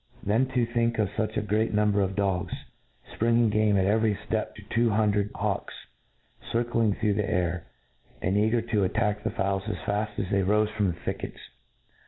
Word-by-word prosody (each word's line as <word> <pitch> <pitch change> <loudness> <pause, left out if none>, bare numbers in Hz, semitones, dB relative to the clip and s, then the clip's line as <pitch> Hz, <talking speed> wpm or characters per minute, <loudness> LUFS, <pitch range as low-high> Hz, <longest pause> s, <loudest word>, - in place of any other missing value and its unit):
Then 115 +6 +2
to 120 -2 +3
think 115 0 0
of 105 -3 +1
fuch 110 0 -2
a - - +2
great 105 +1 0
number 105 -1 +3
of 95 0 -1
dogs, 95 -3 0 0.6
fpringing 115 0 +3
game 105 -1 +3
at 95 - +2
every 110 +1 +2
ftep 105 +2 -3
to 105 - -11
two 115 +1 +3
hundred 105 -1 +2
hawks, - - -2 0.7
^ - - -7
circling 115 -3 +1
through 105 -1 +1
the 105 0 -1
air, 90 -1 -1 0.5
and 95 +2 0
eager 110 +3 +2
to 110 -3 0
attack 105 +2 0
the 115 - 0
fowls 95 -2 -1
as 105 - -2
faft 105 +1 -1
as 95 - -1
they 100 - +3
rofe 105 +3 +2
from 105 -2 +2
the 85 -2 -2
thickets. - - -4
105 Hz, 190 wpm, -27 LUFS, 100-110 Hz, 0.7 s, to